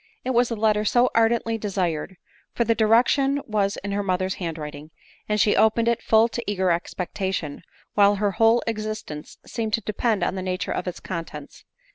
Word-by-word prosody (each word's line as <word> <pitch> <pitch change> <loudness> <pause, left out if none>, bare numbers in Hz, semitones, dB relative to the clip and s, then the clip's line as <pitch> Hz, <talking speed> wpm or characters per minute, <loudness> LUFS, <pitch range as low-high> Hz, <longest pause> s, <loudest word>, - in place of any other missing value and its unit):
It 260 - -1
was 245 -1 +3
the 230 - -2
letter 215 -1 +2
so 240 +4 +3
ardently 225 0 +2
desired; 185 -4 -2 0.4
for 235 - +2
the 230 0 +2
direction 245 +6 +3
was 205 -2 0
in 200 - -3
x - - -1
her - - 0
mother's 185 -1 -1
hand 165 -2 -3
writing! 150 0 -8 0.4
and 210 0 +1
she 205 - +4
opened 220 +1 +3
it 235 0 +1
full 220 0 +4
of 230 - -4 0.2
eager 190 -3 +1
expectation, 180 -2 -3 0.3
while 205 0 +5
her 205 0 0
whole 225 +4 +3
existence 215 -9 -5
seemed 220 -2 -4
to 230 - +2
depend 215 -1 -1
on - - 0
the 190 - -4
nature 185 0 -3
of 180 - -3
its 180 - -5
contents. 165 -5 -7
210 Hz, 190 wpm, -24 LUFS, 185-225 Hz, 0.4 s, while